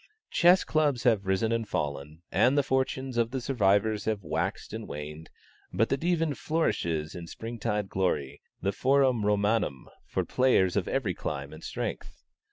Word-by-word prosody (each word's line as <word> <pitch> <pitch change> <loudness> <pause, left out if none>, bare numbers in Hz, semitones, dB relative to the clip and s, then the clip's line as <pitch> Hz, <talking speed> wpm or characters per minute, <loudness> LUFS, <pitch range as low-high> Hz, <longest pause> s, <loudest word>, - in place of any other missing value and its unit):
Chess 180 +2 +5
Clubs 145 -5 +1
have 110 -6 +2
risen 95 +4 +1
and 115 -2 -1
fallen, 75 +1 -3
and 130 +3 +3
the 145 - +4
fortunes 130 -1 -1
of 115 -1 +2
the 130 +2 -3
survivors 105 -4 +1
have 110 -3 -1
waxed - - -3
or - - -4
waned; 75 +2 -7 0.4
but 115 - +1
the - - +2
Divan 165 -1 +1
flourishes 85 - -1
in 85 -2 -7
spring 115 +6 -7
tide 105 0 -1
glory, 90 -8 -1 0.2
the 100 - +2
Forum 130 0 +2
Romanum 105 - 0 0.2
for - - -1
players 125 -8 +3
of 100 -4 0
every 115 -9 0
clime 70 -3 -5
and 80 - -11
strength. - - -5
110 Hz, 165 wpm, -28 LUFS, 90-130 Hz, 0.4 s, Chess